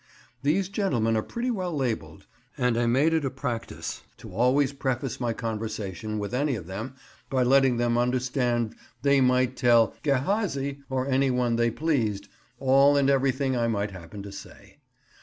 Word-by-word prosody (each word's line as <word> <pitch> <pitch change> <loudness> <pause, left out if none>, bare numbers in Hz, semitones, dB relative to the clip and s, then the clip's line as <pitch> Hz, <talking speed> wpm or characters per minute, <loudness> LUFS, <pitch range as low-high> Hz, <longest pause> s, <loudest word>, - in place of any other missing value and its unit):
These 175 +7 +1
gentlemen 125 - 0
are 110 - +2
pretty 240 - -3
well 185 -7 -2
labelled, 115 -6 -3 0.3
and 125 -3 +1
I 120 0 +1
made 140 +7 +3
it 160 -2 +1
a 135 - 0
practice 125 -3 -5 0.2
to 115 -5 -11
always 130 +6 +2
preface 130 -2 -2
my 120 -2 0
conversation 110 -3 -4
with 105 +2 -4
any 140 +1 +1
of 95 - -7
them 110 +8 -6 0.3
by 130 -2 +2
letting 130 -1 +4
them 120 0 +1
understand 125 -2 0 0.3
they 140 -1 +4
might 125 0 +2
tell 120 -4 +4
"Gehazi," 140 - 0
or 130 -1 -1
any 135 0 +2
one 125 -2 +1
they 115 0 +2
pleased, 115 -7 -1 0.3
all 135 +2 +4
and 140 0 +3
everything 135 0 +1
I 120 -1 +1
might 105 -2 -1
happen 95 +2 -9
to 100 - -8
say. 100 - -12
125 Hz, 165 wpm, -26 LUFS, 115-140 Hz, 0.3 s, letting